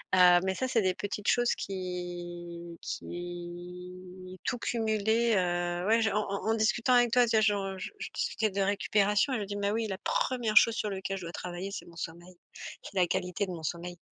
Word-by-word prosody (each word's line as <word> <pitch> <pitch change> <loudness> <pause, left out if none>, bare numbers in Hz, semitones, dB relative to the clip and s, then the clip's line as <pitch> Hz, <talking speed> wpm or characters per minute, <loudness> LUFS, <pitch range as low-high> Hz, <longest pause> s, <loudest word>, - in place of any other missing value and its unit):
heu, 180 -1 +8
mais 190 0 0
ça, 260 - -1
c'est 230 - +3
des 185 -2 +2
petites 205 0 -4
choses 240 -1 +4
qui 175 -2 -6
qui 180 +1 -7
tout 245 - 0
cumulé, 225 0 +1
heu, 175 -1 0
ouais 225 -1 +4
en 210 - +1
en 200 +2 -3
en - - +3
discutant 225 +3 +2
avec 245 -1 +5
toi 245 0 +5
déjà, 225 -2 +3
je 215 -1 +4
re 195 -1 -3
je - - -5
je - - -5
discutais 215 -1 0
de 195 +1 -1
récupération 205 +4 +2
et - - +1
je - - -3
me 205 - -2
dis: 205 - -5
«Mais 200 0 0
oui, 225 0 0
la 190 -2 -3
1re 240 -4 0
chose 230 - +7
sur 210 - -1
lequel 195 0 -3
je 185 - -7
dois 170 - -5
travailler, 180 +2 -5
c'est - - -6
mon 170 - -15
sommeil, 175 +2 -7 0.5
c'est - - -9
la 180 -2 +4
qualité 190 +2 -1
de - - -5
mon 165 -2 -7
sommeil» 175 +2 -4
190 Hz, 210 wpm, -30 LUFS, 175-215 Hz, 0.5 s, heu